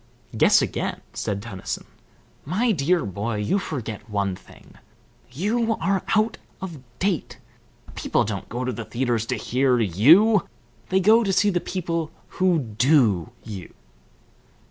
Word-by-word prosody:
"Guess - - +5
again," - - -3
said 100 0 -3
Tennyson. 100 -5 -5 0.6
"My 210 - +1
dear 170 0 +1
boy, 100 +4 -3
you 105 - 0
forget 120 - -6
one 100 -2 -1
thing. 95 - -17 0.6
You 225 - 0
are 195 -1 +1
out 220 +1 +1 0.2
of 175 -6 -7 0.2
date. 185 -2 -1 0.6
People - - 0
don't 100 -2 -5
go 125 +2 -3
to 130 - -1
the 110 - -5
theatres 120 -2 -1
to 125 - 0
hear 125 +3 +1
you, 155 - +5 0.4
they 190 - +3
go 220 +5 +5
to 195 - 0
see 205 +2 +3
the 180 - +1
people 170 -3 -3 0.3
who 185 -2 +4
do 115 - +2
you." 100 -5 -9
135 Hz, 140 wpm, -24 LUFS, -, 0.6 s, Guess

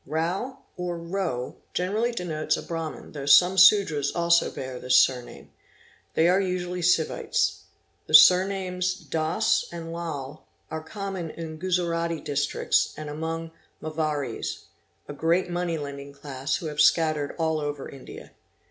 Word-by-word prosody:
Mao 175 - -2 0.2
or 180 -1 -3
Row 170 -7 -3 0.2
generally 210 +7 0
denotes 155 -7 -2
a - - -6
Brahmin 165 -2 -6
though 140 -2 -7
some 175 +7 +7
Sudras 185 -7 +5
also 170 0 +3
bear 130 -1 -6
this 130 0 +3
surname. 125 -2 +1 0.6
They 160 - +4
are 185 +2 +4
usually 180 -1 -3
Sivites. 170 -2 +1 0.5
The 155 - +4
surnames 185 +2 +5
Doss 175 +5 0
and 165 -1 -7
Lal 155 -4 -6 0.3
are 160 0 -3
common 190 0 -5
in 160 -1 -7
Guzarati 170 -2 -1
Districts 140 0 0
and 150 -1 -6
among 165 +2 -4 0.3
Marvaries, 155 -5 -3 0.4
a - - -6
great 170 +4 +1
money 175 -1 -1
lending 140 -1 -7
class 140 -1 -3
who - - -5
have 150 -1 0
scattered 155 -2 +2
all 160 -2 0
over 145 -2 -4
India. 135 - -11
165 Hz, 135 wpm, -26 LUFS, 150-180 Hz, 0.6 s, some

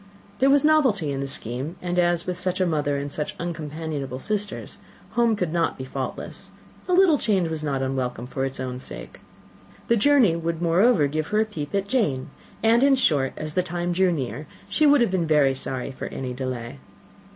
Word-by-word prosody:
There 270 - +4
was 280 +1 +5
novelty 260 - +3
in 135 - -3
the 140 - -2
scheme; 130 +5 -5
and 180 0 -1
as, 175 -1 +2
with 180 -1 -3
such 185 0 -1
a 185 - +3
mother 145 -4 0
and 140 0 -4
such 150 +1 -4
uncompanionable 155 -5 -4
sisters, 205 +7 -4 0.3
home 235 -2 +2
could 180 -5 -2
not 170 -1 0
be 130 - -6
faultless, 130 -1 -6 0.4
a 365 - +1
little 355 -5 +5
change 190 -6 +1
was 160 -1 -3
not 135 -3 -1
unwelcome 130 -3 -2
for 130 +1 -3
its 135 0 -3
own 125 -1 -4
sake. - - -9 0.7
The 235 - +5
journey 240 - +4
would, 165 -1 -2
moreover, 175 +1 +4
give 155 +2 -2
her 210 - +1
a - - +2
peep 160 -5 -5
at 200 0 0
Jane; 155 - 0 0.3
and, 230 +2 +5
in 275 0 +5
short, 145 - +2
as 155 0 -5
the 180 - +2
time 175 0 -3
drew 185 +1 +3
near, 150 -1 -4 0.2
she 310 - +3
would 285 -2 +6
have 235 - +2
been 175 -3 0
very 150 -3 +4
sorry 130 0 -3
for 130 - -6
any 130 -1 -5
delay. 130 0 -5
165 Hz, 200 wpm, -24 LUFS, 135-200 Hz, 0.7 s, would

